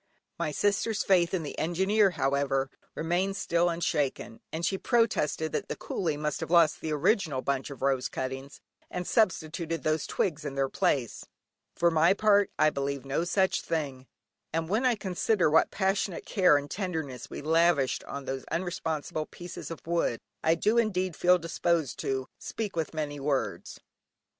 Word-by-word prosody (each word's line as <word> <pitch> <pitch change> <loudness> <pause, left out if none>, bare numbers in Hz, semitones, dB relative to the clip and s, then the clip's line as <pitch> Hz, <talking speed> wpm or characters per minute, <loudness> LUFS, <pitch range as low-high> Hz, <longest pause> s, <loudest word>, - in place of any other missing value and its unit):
My 150 - -1
sister's 205 +6 +1
faith 175 -3 +3
in 185 -4 -1
the 145 - -6
Engineer, 190 +5 +3
however, 135 0 +1 0.2
remained 180 +5 0
still 170 0 +1
unshaken, 145 -8 -1
and 165 +2 -2
she 190 - 0
protested 210 - +1
that - - -2
the - - -2
coolie 160 -6 -2
must 150 -1 -2
have - - -4
lost 170 -3 +4
the 160 - -3
original 155 - +1
bundle 140 0 -2
of - - -10
rose 135 -2 +1
cuttings, 135 +1 -5 0.3
and 180 0 -4
substituted 165 - 0
these 155 0 0
twigs 160 -4 -1
in 140 -2 -5
their 135 -1 +1
place. 125 -4 0 0.5
For 170 0 +3
my 165 +4 +4
part 205 -1 +4
I 155 - +4
believe 140 -1 -3
no 140 +5 -1
such 190 +1 +1
thing, 135 -5 -3 0.4
and 165 0 -1
when 225 +6 +2
I 245 - +3
consider 190 -2 +1
what 160 - +5
passionate 195 -2 -1
care 180 -7 +4
and 145 - -3
tenderness 160 -9 -4
we - - -7
lavished 160 -3 +3
on 140 0 -6
those 135 -1 -4
unresponsive 160 -3 -3
pieces 175 0 -8
of 165 - -8
wood, 165 -8 0 0.2
I 160 +1 +4
do 215 +7 +2
indeed 185 -6 0
feel 180 +1 +4
disposed 165 -3 -1
to 130 -1 -2
"speak 215 -5 -4
with 160 -1 -2
many 145 -2 -3
words." 140 -1 -2
165 Hz, 165 wpm, -29 LUFS, 140-185 Hz, 0.5 s, what